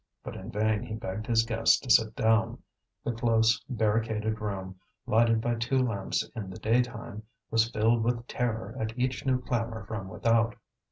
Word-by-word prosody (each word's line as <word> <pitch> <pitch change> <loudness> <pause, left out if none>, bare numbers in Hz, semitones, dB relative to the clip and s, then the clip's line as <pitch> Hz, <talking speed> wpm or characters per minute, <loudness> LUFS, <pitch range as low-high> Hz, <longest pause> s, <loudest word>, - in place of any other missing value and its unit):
But - - -7
in - - -8
vain 105 0 +1
he 115 -2 -5
begged 110 0 -5
his 115 -1 +3
guests 115 0 +3
to 130 - -2
sit 110 -1 +5
down; 110 0 +1 0.4
the - - -1
close, 115 -1 +2
barricaded 110 -2 0
room, 95 -3 -5 0.3
lighted 115 0 +3
by 120 +1 0
two 120 +3 0
lamps 115 -7 0
in 105 -5 -5
the 95 - -8
daytime, 115 -2 -1 0.3
was 115 0 +3
filled 115 +1 +2
with 120 0 -1
terror 120 -3 -3
at 110 +2 -3
each 130 +1 -1
new 130 -1 +3
clamour 115 -4 -3
from 100 -3 -5
without. 115 +3 +1
115 Hz, 170 wpm, -28 LUFS, 110-120 Hz, 0.4 s, sit